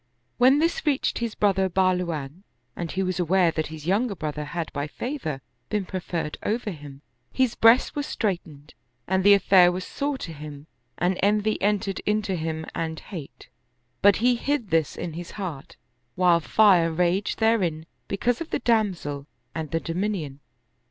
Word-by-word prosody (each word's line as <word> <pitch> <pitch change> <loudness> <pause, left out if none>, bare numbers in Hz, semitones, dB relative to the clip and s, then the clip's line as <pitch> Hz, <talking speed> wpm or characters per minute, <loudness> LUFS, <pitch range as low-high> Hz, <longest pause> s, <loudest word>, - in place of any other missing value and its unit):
When 260 +3 +6
this 330 +3 +1
reached 285 -3 0
his 235 -2 -3
brother 195 -2 +2
Bahluwan 180 -4 0 0.3
and 170 -2 -4
he 190 - -1
was 185 -1 -2
aware 175 0 +3
that 155 -1 -2
his 155 -1 -9
younger 200 +4 +1
brother 150 -2 -4
had 170 +1 -5
by 145 +1 -2
favor 160 - -4 0.3
been 210 -2 -1
preferred 175 -4 -4
over 220 0 -2
him, 145 -3 -11 0.3
his 260 -3 +1
breast 230 +3 +5
was 290 0 -2
straitened 165 -8 -3 0.3
and 190 +1 +1
the 200 +1 +8
affair 185 -2 +5
was 180 +1 -4
sore 285 -1 -2
to 165 -10 -7
him 150 -1 -9 0.3
and 180 +2 0
envy 210 +2 +1
entered 200 -1 0
into 210 -1 -1
him 160 -1 -3
and 160 -1 -3
hate; 155 -7 -9 0.5
but 200 -1 +6
he 245 +2 +3
hid 245 - -2
this 160 -3 +1
in 170 - -5
his 170 +1 -7
heart, 170 -9 -6 0.4
while 175 -2 +4
fire 175 -1 +4
raged 180 +4 0
therein 185 -9 +1 0.2
because 240 +6 0
of 330 - -5
the - - 0
damsel 185 - 0 0.3
and 160 -2 -4
the 165 - 0
do 165 - -5
minion. 175 -7 -2
185 Hz, 165 wpm, -25 LUFS, 160-210 Hz, 0.5 s, the